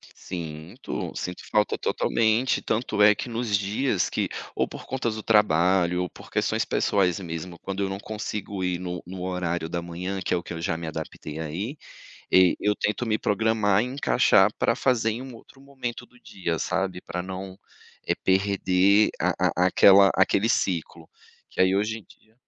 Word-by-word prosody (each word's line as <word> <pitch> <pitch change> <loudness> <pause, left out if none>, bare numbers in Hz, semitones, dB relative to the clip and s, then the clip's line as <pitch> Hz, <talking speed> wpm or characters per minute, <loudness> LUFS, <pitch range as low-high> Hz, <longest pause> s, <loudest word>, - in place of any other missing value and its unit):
Sinto 80 -3 -6
sinto 90 0 -5
falta 105 -1 +2
totalmente. 115 +3 +1
Tanto 110 -2 -1
é 105 0 +7
que - - -5
nos 115 -3 0
dias 100 +2 0
que - - -1 0.3
ou - - +1
por - - -10
conta 130 -2 -2
do 110 -1 -5
trabalho 90 -3 +3
ou 90 - -4
por - - -14
questões - - 0
pessoais 95 -3 +1
mesmo, 85 -1 -6
quando 95 +1 -4
eu 95 - -1
não 95 - -4
consigo 105 -2 -5
ir 90 -1 0
no 90 -1 -5
no 90 0 -7
horário 90 -2 -2
da 85 +1 -3
manhã, 90 +3 -5
que - - -4
é - - +2
o 85 - -5
que - - -7
eu 85 - -6
já 85 -1 -1
me 85 - -6
adaptei 75 0 -6
a 80 -1 -4
ir, 105 - -4 0.6
eh, 95 -1 +6
eu 105 0 +1
tento 105 +3 -1
me 110 -1 +1
programar 105 -1 +2
e - - 0
encaixar 125 - +3
para - - +2
fazer 120 -4 +1
em 115 +3 -4
um 130 -2 -9
outro 135 +3 -16
momento 135 -4 -6
do 125 - -23
dia, 85 -8 -4
sabe, 95 -1 -2
pra 90 - -4
não, 95 0 -7 0.5
eh, - - +2
perder 100 +1 +3
a - - +2 0.3
a - - +5
aquela 95 +1 +7
aquele 100 +3 +3
ciclo. 90 -7 -1 0.4
Que - - -5
aí 95 +1 +4
hoje 105 +2 -1
em - - -14
dia 110 - -22
95 Hz, 185 wpm, -25 LUFS, 90-110 Hz, 0.6 s, é